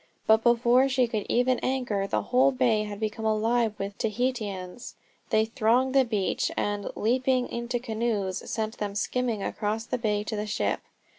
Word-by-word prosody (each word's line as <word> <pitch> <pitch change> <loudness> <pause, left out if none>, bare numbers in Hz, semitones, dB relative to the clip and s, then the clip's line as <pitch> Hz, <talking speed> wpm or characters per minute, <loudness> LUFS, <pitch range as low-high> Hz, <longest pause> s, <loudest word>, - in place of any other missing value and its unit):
But 220 0 +5
before 240 +3 +4
she 260 -1 +3
could 215 -3 -3
even 250 +1 +2
anchor 240 -7 -1
the - - -1
whole 260 +2 +3
bay 240 -5 +2
had 205 -1 -7
become 220 0 -3
alive 220 +1 +1
with 195 0 -4
Tahitians. 215 -3 -3 0.3
They 220 0 +3
thronged 245 +3 +2
the 270 -1 +5
beach, 215 -6 -1
and, 205 -1 -1
leaping 255 +2 +1
into 235 +1 -2
canoes, 220 -5 -2
sent 220 -1 -3
them 205 -1 -3
skimming 230 -1 -1
across 215 +2 -2
the 250 - -2
bay 210 -2 0
to 215 - -4
the 210 0 -3
ship. 210 - -1
225 Hz, 165 wpm, -27 LUFS, 210-250 Hz, 0.3 s, But